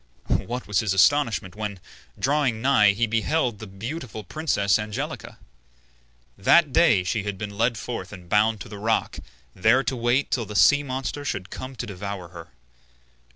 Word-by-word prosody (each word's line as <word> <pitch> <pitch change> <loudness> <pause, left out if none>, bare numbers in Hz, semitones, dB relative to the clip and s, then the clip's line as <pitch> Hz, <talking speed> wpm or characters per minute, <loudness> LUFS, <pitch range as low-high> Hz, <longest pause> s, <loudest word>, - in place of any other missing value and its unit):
What 125 +1 -4
was 105 -4 +1
his 100 -3 0
astonishment 110 -4 +2
when, 105 -2 -5 0.4
drawing 135 -4 +1
nigh, 115 -5 +4
he 120 +4 +1
beheld 115 +1 0
the 110 - -8
beautiful 110 +3 -6
princess 110 -11 +1
Angelica! 105 -1 -5 1.0
That 145 - +4
day 100 -6 +4
she 105 +4 -1
had 100 -1 -4
been 100 0 -6
led 115 +2 +1
forth 120 +2 -6
and 90 -4 -11
bound 105 +3 +2
to - - -7
the 105 -2 -9
rock, 110 +2 0 0.3
there 110 +8 +3
to 135 - -1
wait 120 +3 +1
till 120 -3 0
the 105 - -8
sea 145 +7 +6
monster 135 +1 -4
should 95 -9 -4
come 130 +1 -7
to 120 - -5
devour 100 -3 -6
her. 85 -1 -11
110 Hz, 165 wpm, -24 LUFS, 100-130 Hz, 1.0 s, sea